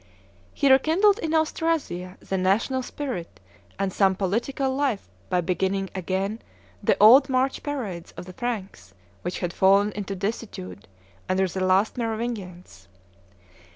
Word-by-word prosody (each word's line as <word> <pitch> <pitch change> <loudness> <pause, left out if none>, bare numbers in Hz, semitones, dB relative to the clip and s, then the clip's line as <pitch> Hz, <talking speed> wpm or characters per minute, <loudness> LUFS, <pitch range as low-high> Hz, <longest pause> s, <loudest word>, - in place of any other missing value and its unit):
He 275 - +2
rekindled 350 - +4
in 320 -4 -1
Austrasia 310 - -1
the 195 - -4
national 200 +8 +1
spirit 250 -9 -6 0.4
and 195 -1 -1
some 190 -2 +3
political 240 +8 -1
life 265 -7 -1 0.2
by 180 - +2
beginning 190 +2 -1
again 195 +4 -2 0.4
the - - +2
old 255 +7 +8
March 260 +1 +1
parades 220 - -5
of - - -7
the 185 - -10
Franks, 190 - -5 0.3
which 175 - -4
had 175 -1 -2
fallen 200 +2 +4
into 200 -1 -5
desuetude 190 - -5 0.4
under 190 +1 +2
the 185 +1 -3
last 190 +6 +2
Merovingians. 205 - -5
200 Hz, 130 wpm, -25 LUFS, 185-260 Hz, 0.4 s, old